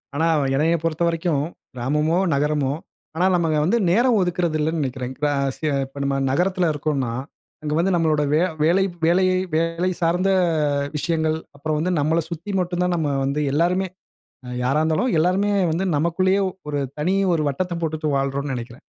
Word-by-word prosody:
ஆனா, 160 +3 +2 0.3
என்னைய 160 +4 +2
பொறுத்த 165 0 -1
வரைக்கும், 165 -3 0 0.3
கிராமமோ 150 +7 0 0.2
நகரமோ, 145 -1 +1 0.4
ஆனா 175 +3 +2
நம்ம 170 -2 +1 0.2
வந்து 195 +8 +2
நேரம் 235 +5 +3
ஒதுக்குறது 175 -3 0
இல்லைன்னு 160 +1 0
நினைக்கிறேன், 130 -1 -4
இப்போ 150 +1 0 0.3
சி - - -6 0.4
நம்ம 140 0 0 0.2
நகரத்தில 180 +3 +1
இருக்கோம்னா, 140 -4 -1 0.5
அங்க 150 -1 -2
வந்து 185 +3 +2
நம்மளோட 160 -3 +2
வே 155 - +4 0.2
வேலை 175 +5 +4 0.2
வேலையை 185 +2 +3 0.2
வேலை 165 +2 0
சார்ந்த 175 +3 +2 0.7
விஷயங்கள், 160 +1 0 0.2
அப்புறம் 155 +2 -2
வந்து 180 +4 0
நம்மளை 160 +3 +2
சுத்தி 170 +4 -6
மட்டும் 175 0 -1
தான் 180 0 +1
நம்ம 160 -3 0 0.2
வந்து 140 +2 -1
எல்லோருமே, 175 +6 +1 0.6
அ - - -8 0.2
யாரா 135 +4 +2
இருந்தாலும், 160 +10 +1
எல்லோருமே 185 +5 +2 0.2
வந்து 170 +4 0
நமக்குள்ளேயே 185 +5 +2 0.3
ஒரு 145 -1 -1 0.2
தனி 175 +6 +1 0.2
ஒரு 160 - 0
வட்டத்தை 175 +5 -2
போட்டுட்டு 155 -1 -2
வாழறோம்னு 135 +1 -1
நினைக்கிறேன். 120 0 -8
160 Hz, 155 wpm, -22 LUFS, 150-180 Hz, 0.7 s, வே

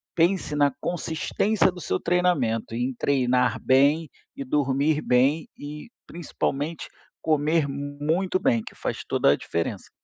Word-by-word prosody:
pense 170 -2 +1
na 145 -1 +3
consistência 175 +5 0
do 180 -1 -10
seu 95 - -1
treinamento, 170 -12 0
em 125 +2 -1
treinar 125 -3 +1
bem 140 +4 +3 0.3
e 140 - -6
dormir 145 +2 +1
bem. 135 +6 +2
E, 150 +5 -8 0.2
principalmente, 160 -2 -3 0.3
comer 155 0 +1
muito 145 +7 -1
bem, 115 -9 +1
que - - -10
faz - - -4
toda 70 - +3
a - - +4
diferença. 85 0 -4
145 Hz, 130 wpm, -25 LUFS, 130-165 Hz, 0.3 s, a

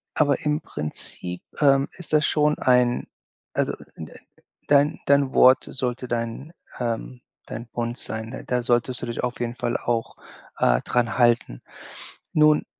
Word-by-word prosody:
Aber 145 -2 +3
im 150 0 0
Prinzip, 90 +3 -6 0.2
ähm, 140 -1 +4
ist 180 - -8
das 150 -1 +4
schon 150 0 +2
ein 125 -1 +3 0.5
also, - - 0 0.2
n 80 - -8
äh, - - -14 0.5
dein 145 +1 +3
dein 140 -1 +3
Wort 130 +2 +6
sollte 125 -1 -3
dein 120 +6 -3 0.3
ähm, 120 +1 -3 0.3
dein, 115 +2 -7
Bund 120 +1 -4
sein, 110 -4 -4
ne? 130 - -7
Da 125 0 0
solltest 120 +1 +1
du - - -3
dich 120 - -4
auf 125 0 -3
jeden 120 0 -3
Fall 120 -2 -1
auch, 115 -1 -2 0.4
äh, - - +3
dran 120 -2 0
halten. 120 - +2 0.7
Nun, 150 0 +4
125 Hz, 155 wpm, -24 LUFS, 115-140 Hz, 0.7 s, Wort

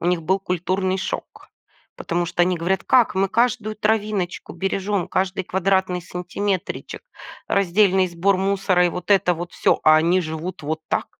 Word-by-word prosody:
у - - -3
них 175 -1 +1
был 190 +5 +1
культурный 185 +1 -1
шок. - - -6 0.5
Потому 175 +1 -2
что 175 +1 +1
они 180 0 +1
говорят: 175 +3 -1
"Как? 245 -6 +3
Мы 195 0 +1
каждую 225 -1 0
травиночку 210 -4 -1
бережем, 195 -1 -1
каждый 185 0 -1
квадратный 190 -1 0
сантиметричек, 180 +2 -4 0.5
раздельный 190 0 +3
сбор 180 +3 +1
мусора 190 -2 +2
и - - +1
вот 180 +3 -7
это 180 -3 +4
вот 175 +1 -7
всё, - - +2
а 155 0 +7
они 170 +4 +3
живут 160 +2 -5
вот 155 +2 -3
так? - - -1
185 Hz, 160 wpm, -22 LUFS, 175-195 Hz, 0.5 s, а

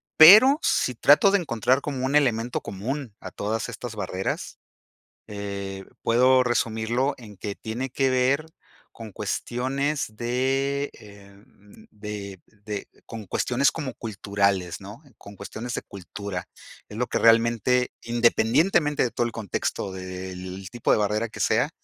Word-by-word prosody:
pero, 215 - +9
si - - +1
trato 200 - +6
de 200 - +3
encontrar 130 - +1
como 135 -3 -3
un 140 - 0
elemento 120 -5 +1
común 120 +5 -5
a - - -9
todas 110 +3 -3
estas 120 -3 -7
barreras, 95 -1 -4 0.7
eh, 100 -1 -6 0.2
puedo 130 +2 +4
resumirlo 120 +2 0
en 110 -4 -12
que 100 +1 -5
tiene 120 +4 -5
que 135 +1 +1
ver 130 +4 +2 0.5
con 115 -2 -10
cuestiones 135 +8 -2
de, 135 +4 0
em, 100 +1 -17
de 100 -3 -7 0.2
de 105 -2 -5 0.2
con 115 -2 -8
cuestiones 125 +8 +1
como 145 -6 -5
culturales, 100 -5 -1
¿no?, 105 +8 -10 0.2
con 100 0 -13
cuestiones 115 +4 -6
de - - -4
cultura, 100 0 -7 0.4
es 105 - -9
lo 125 +1 -1
que - - -1
realmente, 115 +2 +3
independientemente 120 +7 +2
de 125 - -1
todo 120 - 0
el - - -6
contexto, 100 -2 -3
del 95 0 -7
tipo 120 - 0
de - - +4
barrera 105 +2 0
que - - -11
sea, - - +2
115 Hz, 140 wpm, -25 LUFS, 100-130 Hz, 0.7 s, pero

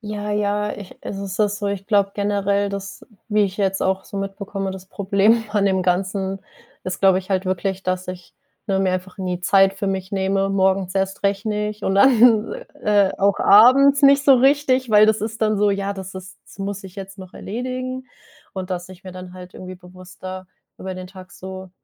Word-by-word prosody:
Ja, 210 -1 -5
ja, 210 0 0
ich 200 -3 -11
es - - -6
ist 195 0 -5
auch 210 - +4
so, 205 0 -4
ich 200 -1 -4
glaube 200 -2 +2
generell, 200 0 0
dass, 195 -1 -7 0.2
wie 210 -1 +2
ich 195 -1 -2
jetzt 195 -1 0
auch 190 0 0
so - - -9
mitbekomme, 195 0 -4
das 190 0 -9
Problem 200 +4 +2
an 205 -2 +1
dem 190 -1 +1
Ganzen 190 +2 -1 0.5
ist, 185 0 -4
glaube 190 -1 +5
ich 185 - -9
halt 190 0 0
wirklich, 190 +1 -2
dass 185 0 -2
ich, 180 -1 -9 0.4
ne, 195 -1 +1
mir 190 -1 +1
einfach 185 +1 -5
nie 180 -2 -3
Zeit 195 +1 +4
für 195 +1 -3
mich 190 0 -4
nehme, 195 0 0
morgens 190 -1 +1
erst 195 +1 -2
recht 200 +1 0
nicht 210 0 -3
und 195 0 0
dann, 230 - +5 0.3
äh, 205 -2 +3
auch 200 0 +2
abends 275 +7 +6
nicht 280 0 +6
so 275 - +7
richtig, 260 0 +2
weil 210 -1 +6
das 220 0 +2
ist 220 +1 -4
dann 215 -1 +1
so: 205 0 +3
„Ja, 200 0 -2
das 190 -1 -8
ist 185 0 -10
das - - -18
muss 200 0 -4
ich 190 -1 -11
jetzt 195 0 -9
noch 185 -1 -11
erledigen“, 255 +3 -5 0.5
und, 190 -1 -6
dass 180 -1 -4
ich 185 0 -14
mir 185 - -9
dann 185 0 -10
halt 180 0 -11
irgendwie 185 0 -8
bewusster 185 +1 -10 0.3
über 190 0 -6
den 185 0 -8
Tag 185 0 -13
so 190 0 -9
195 Hz, 205 wpm, -21 LUFS, 185-210 Hz, 0.5 s, so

